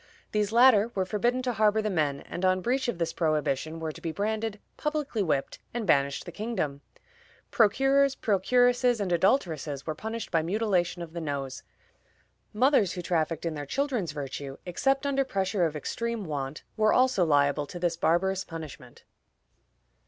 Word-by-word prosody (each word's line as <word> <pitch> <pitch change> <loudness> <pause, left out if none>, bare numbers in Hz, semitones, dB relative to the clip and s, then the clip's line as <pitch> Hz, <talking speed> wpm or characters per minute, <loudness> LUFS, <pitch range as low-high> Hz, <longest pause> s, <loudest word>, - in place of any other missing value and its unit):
These 210 -1 0
latter 230 -3 +6
were 190 -1 +1
forbidden 240 +6 0
to 250 -1 -1
harbor 215 -1 +3
the 215 -1 -1
men, 145 -5 0
and 175 - -7
on 185 0 +3
breach 255 +5 0
of 240 - -2
this 170 -1 -2
prohibition 155 -1 -1
were 160 -1 -3
to - - -13
be 165 - -3
branded, 215 +4 -2 0.2
publicly 300 -7 -2
whipped, 150 -7 -1 0.2
and 235 -2 -2
banished 140 -5 +2
the 175 - -7
kingdom. 170 -9 -3 0.7
Procurers, 270 +5 +3
procuresses, 245 +3 +2
and 195 -3 -2
adulteresses 165 - +1
were 155 - -2
punished 220 +7 -5
by 165 - +3
mutilation 180 -1 0
of 165 -1 -10
the 170 - -4
nose. 140 -4 -4 0.9
Mothers 225 - +3
who 180 - -5
trafficked 165 -1 -1
in 165 - -1
their 145 -2 -6
children's 250 - -1
virtue, 140 -1 -6
except 270 - 0
under 275 -1 +2
pressure 195 -6 0
of 155 - -7
extreme 230 +8 -3
want, 145 -2 -4
were 215 -1 +3
also 255 -7 +3
liable 145 -2 +2
to 175 - -8
this 175 -1 0
barbarous 185 +3 +1
punishment. 150 -7 -10
185 Hz, 165 wpm, -28 LUFS, 155-230 Hz, 0.9 s, latter